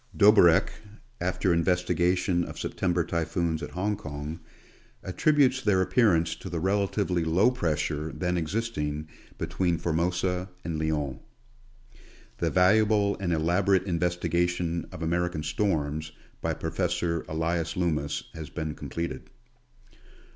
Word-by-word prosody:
Doberck, 100 -5 +6 0.5
after 90 +1 +1
investigation 90 +1 +1
of - - -7
September 90 -2 0
typhoons 85 0 -1
at - - -5
Hong 105 +4 -1
Kong, 75 -3 -6 0.6
attributes 135 +6 +2
their 105 -5 +3
appearance 90 -5 +3
to 95 - -8
the 85 -1 -3
relatively 95 -1 0
low 90 +9 +3
pressure 80 -7 -1
then 90 -1 -1
existing 80 -5 -2 0.3
between 90 -3 0
Formosa 90 +3 -1
and 80 -1 -3
Lyon, 75 -5 -1 1.2
The - - +1
valuable 105 +2 +4
and 95 -3 -1
elaborate 90 +4 +2
investigation 90 -1 0
of 80 - -7
American 85 -1 -1
Storms, 80 -2 -1 0.3
by - - -1
Professor 85 0 -1
Elias 80 +1 -1
Loomis 75 -5 -1
has 80 -1 -7
been 80 -2 -4
completed. 85 -5 -5
85 Hz, 110 wpm, -27 LUFS, 80-95 Hz, 1.2 s, Doberck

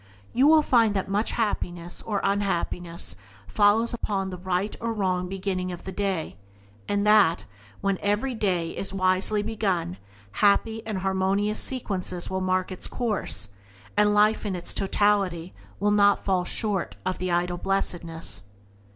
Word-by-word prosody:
You 260 +4 +4
will 310 0 +6
find 230 -6 +3
that 195 - -1
much 205 +3 0
happiness 175 -6 -2
or 205 -3 -2
unhappiness 175 - -1 0.3
follows 215 - +3
upon 195 -4 -2
the 180 - -6
right 185 +3 -1
or 230 0 -1
wrong 185 -4 -1
beginning 185 -1 -2
of 175 - -8
the 190 - -6
day, 190 - -2 0.5
and 205 0 0
that, 210 -5 +5 0.4
when 195 -1 0
every 210 +6 0
day 180 -7 0
is 195 - 0
wisely 190 +3 +2
begun, 195 - -1 0.3
happy 220 - +2
and 215 -3 -2
harmonious 195 +2 0
sequences 190 -9 -2
will 190 0 -1
mark 185 0 0
its 185 - -2
course, 215 - 0 0.5
and 210 0 +4
life 215 +1 +4
in 200 -3 -2
its 175 - -3
totality 195 -4 +1 0.3
will 205 +2 +2
not 205 -1 +4
fall 185 -2 +1
far - - -5
short 205 -5 -1
of 185 - -2
the 185 - -2
ideal 175 0 0
blessedness. 170 - -2
195 Hz, 150 wpm, -26 LUFS, 180-210 Hz, 0.5 s, will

